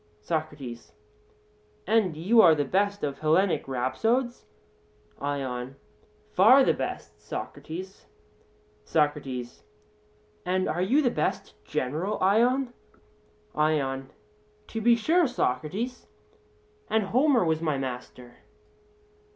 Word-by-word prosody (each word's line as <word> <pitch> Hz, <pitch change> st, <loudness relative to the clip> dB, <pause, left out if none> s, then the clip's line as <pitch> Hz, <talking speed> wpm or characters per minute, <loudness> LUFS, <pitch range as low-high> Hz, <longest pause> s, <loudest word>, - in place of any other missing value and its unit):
SOCRATES: 145 Hz, -4 st, -5 dB, 0.9 s
And 205 Hz, -6 st, +2 dB
you 215 Hz, +8 st, +5 dB
are 160 Hz, -, +7 dB
the 145 Hz, -1 st, 0 dB
best 200 Hz, +6 st, 0 dB
of 140 Hz, -2 st, -3 dB
Hellenic 165 Hz, +4 st, +2 dB
rhapsodes? 225 Hz, -, -1 dB, 0.7 s
ION: 135 Hz, -2 st, -4 dB, 0.6 s
Far 250 Hz, +9 st, +7 dB
the -, -, +3 dB
best, -, -, -6 dB
Socrates. 185 Hz, +4 st, -7 dB, 0.8 s
SOCRATES: 140 Hz, -5 st, -1 dB, 0.8 s
And 185 Hz, +1 st, 0 dB
are 170 Hz, +3 st, -1 dB
you 265 Hz, +11 st, +3 dB
the 245 Hz, -, +2 dB
best -, -, -2 dB
general, 155 Hz, +9 st, -2 dB
Ion? 240 Hz, +6 st, +2 dB, 0.8 s
ION: 135 Hz, -4 st, 0 dB, 0.6 s
To 225 Hz, -, -4 dB
be 235 Hz, +1 st, +5 dB
sure, 325 Hz, +8 st, +2 dB
Socrates; 215 Hz, -, -2 dB, 0.8 s
and 220 Hz, 0 st, +2 dB
Homer 250 Hz, -, +3 dB
was 160 Hz, -1 st, 0 dB
my 155 Hz, -4 st, 0 dB
master. 125 Hz, -2 st, -7 dB
165 Hz, 100 wpm, -27 LUFS, 140-225 Hz, 0.9 s, are